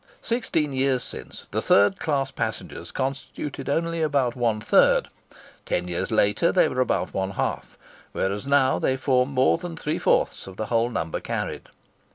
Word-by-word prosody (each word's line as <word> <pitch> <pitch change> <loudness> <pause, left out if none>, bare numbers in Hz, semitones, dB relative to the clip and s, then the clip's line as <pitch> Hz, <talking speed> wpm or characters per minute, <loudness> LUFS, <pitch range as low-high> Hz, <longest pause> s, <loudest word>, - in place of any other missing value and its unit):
Sixteen 165 - -1
years 130 -1 +1
since, - - -7
the - - 0
third 100 +1 +4
class 140 -3 0
passengers 110 -2 -4
constituted 135 +1 -4
only 165 +3 0
about 140 -6 +1
one 115 -3 0
third; - - +4 0.6
ten 90 0 -1
years 85 -1 -2
later, 110 +7 +2
they 185 - +4
were 130 - -1
about 130 - 0
one 95 0 -1
half; 95 - -3 0.3
whereas 100 +6 -2
now 140 -2 +3
they 130 - +1
form 130 -1 +2
more 135 +3 +3
than 165 -1 -7
three 150 -1 -2
fourths - - +1
of 95 0 -10
the 110 - -2
whole 115 +1 +3
number 80 -8 -3
carried. - - -4
130 Hz, 165 wpm, -25 LUFS, 110-145 Hz, 0.6 s, third